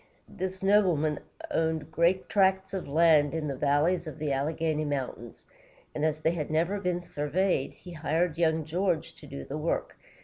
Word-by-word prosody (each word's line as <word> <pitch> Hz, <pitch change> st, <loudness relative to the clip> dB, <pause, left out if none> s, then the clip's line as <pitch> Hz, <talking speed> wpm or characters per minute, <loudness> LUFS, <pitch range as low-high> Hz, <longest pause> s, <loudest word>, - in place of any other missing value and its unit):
This 190 Hz, 0 st, -5 dB
nobleman 180 Hz, -7 st, +3 dB, 0.3 s
owned 160 Hz, -1 st, -1 dB
great 170 Hz, +4 st, +2 dB
tracts 190 Hz, -1 st, +2 dB
of 190 Hz, -, -3 dB
land 155 Hz, 0 st, +4 dB
in 155 Hz, -2 st, -2 dB
the 140 Hz, -, -2 dB
valleys 150 Hz, +6 st, +1 dB
of 155 Hz, -, -7 dB
the 150 Hz, -2 st, -2 dB
Alleghany 155 Hz, +2 st, -1 dB
Mountains, 130 Hz, -5 st, -4 dB, 0.5 s
and 150 Hz, -, -3 dB
as 155 Hz, 0 st, 0 dB
they 160 Hz, -, +3 dB
had 160 Hz, -4 st, -3 dB
never 170 Hz, +6 st, +1 dB
been 180 Hz, -2 st, -1 dB
surveyed, 150 Hz, 0 st, 0 dB
he 180 Hz, -, -12 dB
hired 165 Hz, +1 st, 0 dB
young 160 Hz, -2 st, +2 dB
George 175 Hz, 0 st, -1 dB
to 150 Hz, -, -13 dB
do 140 Hz, 0 st, -7 dB
the 145 Hz, +3 st, -5 dB
work. 160 Hz, +2 st, -2 dB
160 Hz, 170 wpm, -28 LUFS, 150-180 Hz, 0.5 s, land